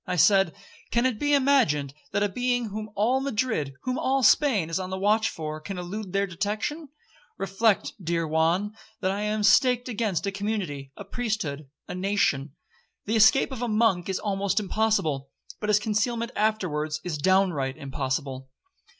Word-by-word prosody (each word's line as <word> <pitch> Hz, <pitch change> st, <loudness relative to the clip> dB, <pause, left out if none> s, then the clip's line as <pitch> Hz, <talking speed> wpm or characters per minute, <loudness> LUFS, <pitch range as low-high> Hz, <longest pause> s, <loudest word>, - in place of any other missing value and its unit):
I 180 Hz, -, -1 dB
said, 195 Hz, -1 st, +4 dB, 0.3 s
'Can 235 Hz, +1 st, +1 dB
it 245 Hz, -5 st, 0 dB
be 290 Hz, 0 st, +3 dB
imagined 250 Hz, -, +2 dB, 0.2 s
that 205 Hz, -, +1 dB
a -, -, +3 dB
being 245 Hz, +2 st, -1 dB
whom 215 Hz, +1 st, -5 dB
all 230 Hz, +6 st, +2 dB
Madrid, 220 Hz, -, -1 dB
whom 255 Hz, 0 st, -2 dB
all 270 Hz, 0 st, +1 dB
Spain, 225 Hz, -, +4 dB
is 165 Hz, -, 0 dB
on 185 Hz, -1 st, -4 dB
the 190 Hz, -, -3 dB
watch 215 Hz, +3 st, +2 dB
for, 155 Hz, -1 st, -5 dB
can 195 Hz, +4 st, -6 dB
elude 185 Hz, +3 st, -5 dB
their 200 Hz, +1 st, +1 dB
detection? 210 Hz, -, -3 dB, 0.5 s
Reflect, 195 Hz, +2 st, +1 dB
dear 165 Hz, 0 st, 0 dB
Juan, 170 Hz, +7 st, +1 dB, 0.3 s
that 190 Hz, -, +1 dB
I 200 Hz, +1 st, -3 dB
am 210 Hz, 0 st, -1 dB
staked 250 Hz, +2 st, +4 dB
against 215 Hz, -6 st, -1 dB
a 200 Hz, -, -1 dB
community, 195 Hz, -10 st, -3 dB
a -, -, -8 dB
priesthood, 200 Hz, -, -3 dB, 0.2 s
a -, -, -5 dB
nation. 180 Hz, -7 st, 0 dB, 0.5 s
The 220 Hz, -, 0 dB
escape 225 Hz, +6 st, +5 dB
of 255 Hz, -3 st, -6 dB
a 245 Hz, -, 0 dB
monk 215 Hz, -5 st, +2 dB
is 190 Hz, -, 0 dB
almost 200 Hz, 0 st, 0 dB
impossible,—but 210 Hz, -4 st, -2 dB
his 210 Hz, -, +5 dB
concealment 225 Hz, +3 st, -1 dB
afterwards 155 Hz, -8 st, 0 dB
is 160 Hz, -4 st, -3 dB
downright 170 Hz, -7 st, +2 dB
impossible. 135 Hz, -1 st, -4 dB
200 Hz, 165 wpm, -26 LUFS, 165-220 Hz, 0.5 s, escape